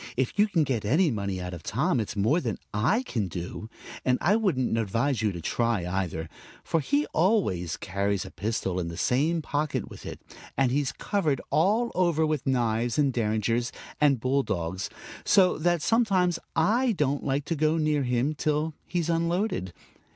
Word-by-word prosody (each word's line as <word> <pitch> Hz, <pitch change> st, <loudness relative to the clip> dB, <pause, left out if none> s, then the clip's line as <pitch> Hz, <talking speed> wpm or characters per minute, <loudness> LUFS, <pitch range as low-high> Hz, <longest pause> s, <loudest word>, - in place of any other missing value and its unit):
If 130 Hz, -1 st, 0 dB
you 210 Hz, -, +6 dB
can 170 Hz, -6 st, +2 dB
get 130 Hz, -6 st, -1 dB
any 155 Hz, -, +3 dB
money 100 Hz, -4 st, -2 dB
out 90 Hz, 0 st, -5 dB
of 85 Hz, -, -7 dB
Tom 140 Hz, -, 0 dB
it's 110 Hz, -, -3 dB
more 115 Hz, -, +2 dB
than 115 Hz, -6 st, -2 dB, 0.2 s
I 145 Hz, -, +2 dB
can 110 Hz, -, -2 dB
do. 90 Hz, +5 st, -6 dB, 0.3 s
And 125 Hz, -1 st, +2 dB
I 200 Hz, +5 st, +3 dB
wouldn't 160 Hz, -, +1 dB
advise 115 Hz, +4 st, 0 dB
you 105 Hz, -2 st, +1 dB
to 85 Hz, -2 st, -7 dB
try, 115 Hz, +1 st, 0 dB
either; 90 Hz, -3 st, -2 dB, 0.4 s
for 165 Hz, -, 0 dB
he 145 Hz, 0 st, +1 dB
always 155 Hz, -, +1 dB
carries 100 Hz, 0 st, -1 dB
a 95 Hz, -, -9 dB
pistol 95 Hz, -2 st, -2 dB
in 85 Hz, -, -2 dB
the 85 Hz, 0 st, -6 dB
same 155 Hz, +6 st, +1 dB
pocket 150 Hz, +1 st, -2 dB
with -, -, -10 dB
it, -, -, -7 dB, 0.4 s
and 135 Hz, -2 st, +3 dB
he's 140 Hz, 0 st, 0 dB
covered 160 Hz, -10 st, -1 dB
all 210 Hz, -, +2 dB
over 170 Hz, -3 st, +2 dB
with 155 Hz, -4 st, -2 dB
knives 120 Hz, -2 st, +1 dB
and 140 Hz, -3 st, +2 dB
derringers 115 Hz, +1 st, 0 dB, 0.3 s
and 140 Hz, -4 st, +4 dB
bull 130 Hz, +4 st, +1 dB
dogs, 95 Hz, -5 st, -3 dB, 0.3 s
so 185 Hz, -5 st, +4 dB
that 175 Hz, -1 st, +1 dB
sometimes 195 Hz, -7 st, +2 dB, 0.2 s
I 225 Hz, +9 st, +3 dB
don't 145 Hz, -5 st, 0 dB
like 140 Hz, 0 st, -1 dB
to 165 Hz, -, -1 dB
go 155 Hz, +2 st, +2 dB
near 155 Hz, -2 st, +1 dB
him 125 Hz, +3 st, 0 dB
till 155 Hz, +1 st, -1 dB
he's 175 Hz, -2 st, -1 dB
unloaded. 170 Hz, -, 0 dB
135 Hz, 180 wpm, -27 LUFS, 110-165 Hz, 0.4 s, you